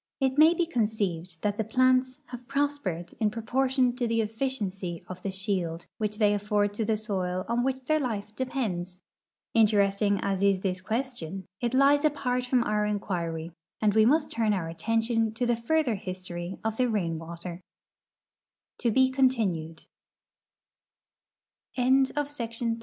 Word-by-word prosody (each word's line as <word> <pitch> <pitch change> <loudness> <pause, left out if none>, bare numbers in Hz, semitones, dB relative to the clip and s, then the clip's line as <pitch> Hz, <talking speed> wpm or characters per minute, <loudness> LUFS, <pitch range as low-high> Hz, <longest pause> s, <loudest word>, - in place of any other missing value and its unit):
It 265 -2 +1
may 320 +3 +7
be 345 - +1
conceived 200 - -2
that 205 0 -1
the - - +2
plants 255 +3 +2
have 245 -1 -9
pros 285 +1 0
pered 175 -7 -4
in 215 - +3
proportion 250 +3 +1
to 245 -2 0
the 230 0 +1
efficiency 210 -6 -3
of 185 0 -8
the 195 - -3
shield 185 -4 -2
which 210 -1 -2
they 210 -2 +4
afford 205 0 0
to 220 - -2
the 220 0 +1
soil 185 -4 -2
on 235 +1 +1
which 265 0 -1
their 310 +4 +2
life 215 -6 -3
depends. 195 -9 -3 0.5
Interesting 205 -2 +3
as 195 -1 -1
is 200 -2 +3
this 185 -1 -1
question, 195 -5 -3
it 240 +1 -1
lies 280 +2 +5
apart 255 -4 0
from 250 -1 +3
our 210 -2 0
inquiry, 175 -6 -2 0.3
and 210 -2 +2
we 220 +1 +5
must 300 +3 +2
turn 220 -2 +1
our 180 -5 -2
attention 225 +6 0
to 245 - 0
the 240 0 +2
further 255 +2 +1
hi 185 -2 -4
220 Hz, 130 wpm, -28 LUFS, 195-255 Hz, 0.5 s, may